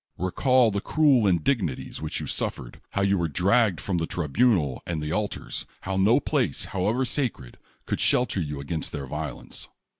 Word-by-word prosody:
Recall 120 - +3
the 100 0 -2
cruel 140 -8 +3
indignities 90 - 0
which 80 - -3
you - - -4
suffered; 65 -3 -4
how 100 - +1
you 100 -1 +2
vrere 85 -2 -1
dragged 100 - +3
from 90 -3 -1
the 80 - -2
tribunal 85 - +1
and 85 -2 -2
the 75 0 -3
altars; 105 +3 -3
how 95 +1 -3
no 100 +5 +4
place, - - 0
hoAvever 110 +8 +1
sacred, 120 - -2 0.3
could - - -2
shelter 125 -6 +2
you 75 -3 -4
against 75 +3 -4
their 70 -3 -4
violence. 75 0 -6
95 Hz, 170 wpm, -26 LUFS, 75-115 Hz, 0.3 s, no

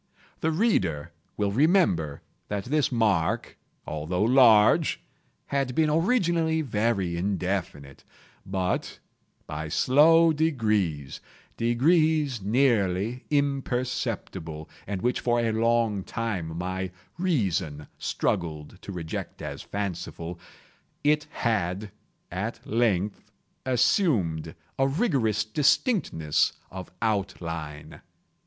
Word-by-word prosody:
The 160 - +1
reader 130 - +1 0.3
will 100 -1 0
remember 115 - +2 0.2
that 100 -1 -3
this 150 +2 +1
mark, 105 -9 +1 0.3
although 80 +5 -2
large, 115 -3 +5 0.5
had 135 -3 -1
been 155 -1 +3
originally 165 -3 +2
very 105 - 0
indefinite; 90 -6 -3 0.4
but, 95 -1 -2 0.5
by 75 +1 -5
slow 160 - +5
degrees—degrees 125 - 0
nearly 110 -1 +1
imperceptible, 125 - -2 0.2
and 100 -2 -4
which 125 +1 +1
for 120 -1 +1
a 115 -1 +1
long 115 -3 +1
time 95 -9 -3
my 95 +1 -3 0.3
reason 95 - 0
struggled 80 +2 -2
to - - -8
reject 85 -4 -5
as - - -5
fanciful—it 95 - -4
had, 100 -3 -1 0.4
at 100 +6 -3
length, 105 -4 0 0.4
assumed 100 - +1 0.2
a 135 - +4
rigorous 135 - +1
distinctness 120 - +1 0.2
of 95 -2 -7
outline. 85 -8 -3
110 Hz, 90 wpm, -26 LUFS, 90-135 Hz, 0.5 s, large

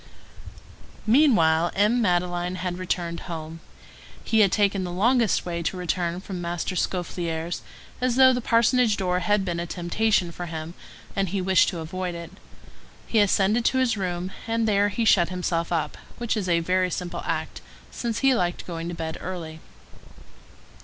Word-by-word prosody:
Meanwhile, 195 - +4
M. 215 +5 +3
Madeleine 175 -2 0
had 180 0 -4
returned 175 -2 -2
home. 160 -1 -6 0.6
He 220 - +2
had 200 -3 +5
taken 200 -2 +2
the 180 - -4
longest 230 +4 +2
way 170 -1 -3
to 175 +3 -2
return 175 0 -1
from 185 -2 -6
Master 175 +2 -3
Scaufflaire's, 170 -2 -2 0.4
as 250 -1 +1
though 260 0 +7
the 250 - -1
parsonage 230 -1 +3
door 180 -1 0
had 200 +2 +1
been 170 -2 -2
a 170 - -3
temptation 180 +1 0
for 175 +1 -6
him, 160 0 -6 0.4
and 195 -2 0
he 200 - -2
had 185 - -2
wished 190 0 +4
to 180 - -5
avoid 180 +2 -4
it. 170 -1 -8 0.7
He 225 - +1
ascended 205 +3 +3
to 260 - +2
his 255 -3 +2
room, 180 -2 -3 0.2
and 225 0 0
there 205 -1 +3
he 225 +3 -1
shut 175 -5 +4
himself 175 -2 -2
up, 155 -3 -1 0.2
which 235 -1 -1
was 195 -4 -2
a 170 -1 +3
very 185 +2 +1
simple 180 0 -4
act, - - -3 0.3
since 230 -2 -3
he 270 -1 +5
liked 175 -7 0
to - - -20
go 170 -2 -5
to 170 +1 -4
bed 160 -1 -5
early. 165 -4 -6
180 Hz, 175 wpm, -25 LUFS, 170-210 Hz, 0.7 s, though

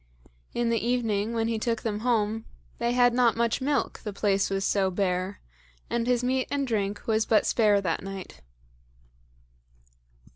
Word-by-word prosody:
In 235 -1 +1
the 230 -2 0
evening 225 -3 0
when 225 -1 0
he 225 -1 -1
took 230 0 -1
them 210 -2 -2
home 220 -2 0 0.3
they 235 +1 0
had 245 -1 +4
not 240 -2 +3
much 235 +1 +1
milk, 285 +2 0
the 210 - -5
place 200 -1 +1
was 195 0 -1
so 195 -2 +2
bare, 185 0 -1 0.5
and 235 0 0
his 250 -1 +2
meat 255 +1 0
and 280 -1 -1
drink 205 -4 -2
was 220 -1 +2
but 220 -1 +3
spare 210 -3 +3
that 170 -4 -1
night. 195 - -8
225 Hz, 160 wpm, -27 LUFS, 200-240 Hz, 0.5 s, had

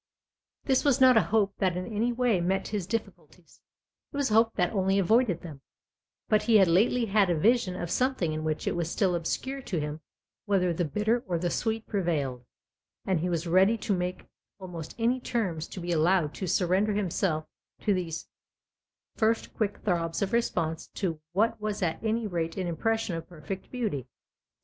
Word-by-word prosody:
This 265 -2 +2
was 280 -2 +3
not 260 -1 +7
a 220 - +6
hope 205 -2 +1
that 185 -3 +1
in 185 - -3
any 225 +4 0
way 240 -6 +1
met 190 +3 0
his 205 -5 -3
difficulties 225 +2 -6 0.5
it - - -6
was 280 -5 0
a - - +2
hope 225 +1 +4
that 180 +1 +1
only 195 -1 +2
avoided 200 -1 +3
them; 150 -6 -9 0.7
but 215 -1 +3
he 230 - +2
had 190 -3 +6
lately 225 +8 +3
had 200 -2 +3
a 170 - +2
vision 205 0 +2
of 175 -1 -4
something 255 -11 +1
in 155 0 -3
which 155 -1 -2
it - - 0
was 170 -2 -1
still 185 0 +1
obscure 260 +11 -2
to 185 -9 -3
him 150 +1 -4 0.4
whether 185 -3 +2
the 175 +1 -1
bitter 215 - 0
or 175 -2 0
the 175 +1 -1
sweet 225 -1 -1
prevailed, 150 - -1 0.6
and 190 -4 +1
he 180 +3 -1
was 170 -1 -1
ready 190 +6 +4
to 205 -1 -1
make 180 0 -3 0.3
almost 175 -4 -8
any 240 +2 +1
terms 185 -11 -2
to - - -8
be 175 0 -3
allowed 165 -1 +2
to 190 - -4
surrender 190 +5 +2
himself 180 -5 0 0.4
to 210 - +2
these 170 -3 -3 0.9
first 225 +1 +1
quick 210 -2 -2
throbs 170 -1 0
of 195 - -3
response 165 -8 0
to 165 -6 -2
what 220 +3 +1
was 210 -2 -2
at 165 +3 -2
any 225 +1 0
rate 170 -4 -2
an 185 - -1
impression 220 +4 -1
of 165 0 -7
perfect 175 +3 -7
beauty. 210 - -3
190 Hz, 190 wpm, -28 LUFS, 170-220 Hz, 0.9 s, not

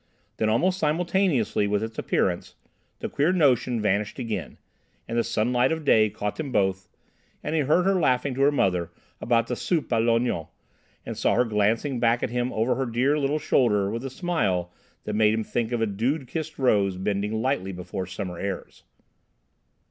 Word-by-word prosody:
Then, 110 - +1
almost 180 +12 +2
simultaneously 160 - +1
with 105 +1 0
its 110 0 -5
appearance, - - -1 0.5
the - - -2
queer 150 +5 +1
notion 130 -8 +2
vanished 105 0 0
again, 115 -4 -4 0.5
and 115 - -4
the 120 - +2
sunlight 125 +5 +1
of 160 -1 -3
day 110 -5 +5
caught 105 +1 -4
them 150 -4 -4
both, 95 -3 0 0.5
and - - -3
he 160 - +2
heard 150 +6 +3
her 195 - +3
laughing 130 -3 +1
to 135 - -3
her 140 +1 +5
mother 90 - +1 0.3
about 115 -1 +2
the 125 - -3
soupe 165 +4 -1
à 115 -2 +2
l'onion, 115 -8 +1 0.6
and - - -6
saw - - +2
her 125 +2 +3
glancing 115 +5 0
back 115 0 +2
at 120 - -1
him 125 +1 -1
over 115 +3 +1
her 130 +1 -2
dear 130 +6 +1
little 145 +1 0
shoulder 105 -9 +2
with 115 +3 -4
a 135 - -4
smile 125 - -1 0.3
that 105 - -4
made 105 0 +3
him 110 - -1
think 115 +1 -2
of 120 -2 -1
a - - +3
dew 120 +8 -1
kissed 160 +4 -5
rose 100 -8 +2
bending 105 +3 -1
lightly 115 -6 -1
before 90 +1 -5
summer 90 -2 -6
airs. 100 -1 -5
115 Hz, 185 wpm, -25 LUFS, 105-140 Hz, 0.6 s, day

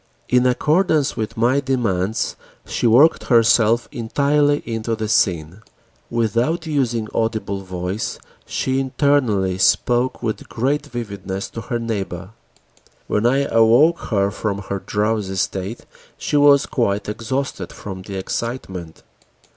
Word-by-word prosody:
In 125 0 +4
accordance 155 +3 +2
with 110 +1 -4
my 120 +5 +3
demands, 115 -7 -1 0.3
she - - 0
worked 130 +8 +5
herself 115 -1 +4
entirely 145 +5 +1
into 115 0 -2
the 110 0 -3
scene: 90 -2 +1 0.5
without 120 - 0
using 125 -8 -1
audible 110 -3 -1
voice, 90 +2 -4 0.3
she 130 0 -1
internally 125 -9 +1
spoke 120 +6 +2
with 110 -2 -3
great 135 +5 -1
vividness 100 -5 -5
to 115 - -6
her 120 - -3
neighbor. 100 -5 -4 0.7
When 105 +3 +1
I 135 +3 +2
awoke 115 +9 +4
her 100 -2 +1
from 100 0 -3
her 100 - -2
drowsy 105 -1 -1
state, 95 +4 -3 0.3
she - - -3
was 145 -1 +6
quite 100 -4 -1
exhausted 125 +6 -3
from 95 -2 -8
the 95 +1 -8
excitement. 95 -4 -5
115 Hz, 125 wpm, -20 LUFS, 100-130 Hz, 0.7 s, was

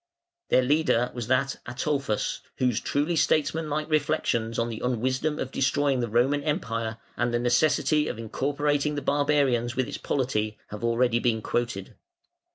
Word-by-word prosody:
Their 130 - +4
leader 125 -3 +2
was 120 -3 -5
that 130 +1 +1
Ataulfus 130 -2 -1 0.2
whose 125 -4 +1
truly 150 +4 0
statesmanlike 155 0 +1
reflections 120 -7 0
on 115 0 0
the 115 - -6
unwisdom 130 +5 0
of 130 - -4
destroying 135 0 +1
the 120 -2 -1
Roman 130 +6 +2
Empire 115 - -2 0.2
and 120 0 0
the 120 - +1
necessity 150 +5 +2
of - - -4
incorporating 145 +5 -1
the 145 - -3
barbarians 140 -5 +2
with 130 -1 0
its - - -6
polity 110 -6 -1
have 105 - -6
been 115 - 0
already 120 -1 +2
quoted. 115 -5 -2
130 Hz, 150 wpm, -26 LUFS, 120-145 Hz, 0.2 s, Their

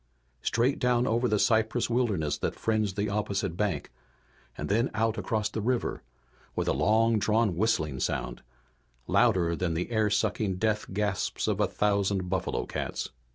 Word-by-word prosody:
Straight 125 +5 +1
down 125 -1 +2
over 120 +2 +1
the 105 - +2
cypress 110 +2 +2
wilderness 105 -12 0
that - - -2
fringed 110 -3 0
the 105 +1 0
opposite 100 -3 -1
bank, 95 -9 -2 0.7
and - - -4
then 115 +5 +2
out 110 0 +1
across 110 -3 -1
the 110 +1 -4
river 125 +3 -1 0.5
with - - -1
a - - +3
long 110 +10 +3
drawn 110 -2 +2
whistling 80 -9 0
sound, - - -2 0.6
louder 95 -8 +3
than 85 -1 -1
the 90 +8 -3
air 110 -2 +2
sucking 100 -1 0
death 105 +2 -1
gasps 100 0 -1
of - - 0
a - - +3
thousand 100 -3 0
buffalo 95 - -1
cats. - - -4
105 Hz, 155 wpm, -28 LUFS, 95-115 Hz, 0.7 s, a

